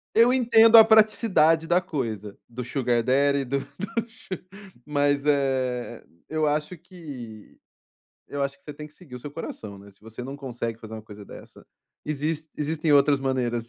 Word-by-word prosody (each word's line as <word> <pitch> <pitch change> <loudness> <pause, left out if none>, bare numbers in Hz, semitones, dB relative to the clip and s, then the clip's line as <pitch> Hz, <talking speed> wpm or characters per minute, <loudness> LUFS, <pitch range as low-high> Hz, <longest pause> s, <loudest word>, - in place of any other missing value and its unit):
Eu 230 +2 +6
entendo 230 -3 +6
a 225 - +11
praticidade 210 -7 +4
da 175 +2 +2
coisa, 110 - -5
do 120 +1 -6
sugar 120 -1 0
daddy, 140 +3 +2
do 140 +2 -1 0.2
do 230 +3 -3
su 225 -1 -21 0.6
mas, 145 -1 +1
eh, 130 -4 0 0.3
eu 155 0 0
acho 150 +4 -1
que 145 - -11 0.7
eu 145 -1 -4
acho 140 0 -3
que - - -36
você 150 - -8
tem 150 +1 -9
que 150 - -26
seguir 155 -8 -14
o 125 - -8
seu 145 - -8
coração, 105 -9 -8
né. 100 +1 -14
Se 95 - -32
você 115 +2 -11
não 135 +3 -7
consegue 120 -4 -5
fazer 110 0 -9
uma 110 - -8
coisa 105 -1 -12
dessa, - - -14 0.4
existe 155 +1 -3
existem 155 +1 0
outras 140 0 +4
maneiras 120 -3 -1
140 Hz, 175 wpm, -25 LUFS, 120-160 Hz, 0.7 s, a